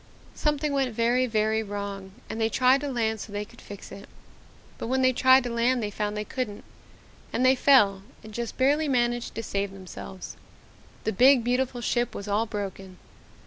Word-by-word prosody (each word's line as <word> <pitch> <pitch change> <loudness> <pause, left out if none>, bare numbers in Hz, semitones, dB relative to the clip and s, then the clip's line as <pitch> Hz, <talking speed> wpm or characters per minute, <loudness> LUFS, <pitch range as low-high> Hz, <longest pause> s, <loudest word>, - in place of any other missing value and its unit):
"Something 295 -1 0
went 265 -4 0
very, 240 +3 +2
very 220 -1 +1
wrong 200 -2 -6
and 225 - -5
they 220 - +2
tried 255 +3 +3
to 290 - -3
land 220 -4 -1
so 205 - -8
they 205 0 -3
could - - -17
fix 200 -1 -10
it. 200 - -11 0.7
But - - -4
when 260 +2 +1
they 255 0 +4
tried 260 +1 +5
to 245 - -4
land 235 +1 +1
they 205 - -3
found 210 +1 -3
they 210 - -2
couldn't 225 -5 -4 0.7
and 255 - +1
they 260 - +6
fell 230 -8 +4 0.2
and 215 0 -11
just 235 +1 -5
barely 290 +4 +2
managed 240 -2 0
to 225 - -4
save 200 -1 -2
themselves. 190 0 -9 0.7
The 220 - -1
big, 255 +4 +5
beautiful 250 0 -1
ship 240 0 -1
was 200 - -6
all 210 +3 0
broken. 195 -3 -6
230 Hz, 185 wpm, -26 LUFS, 205-255 Hz, 0.7 s, they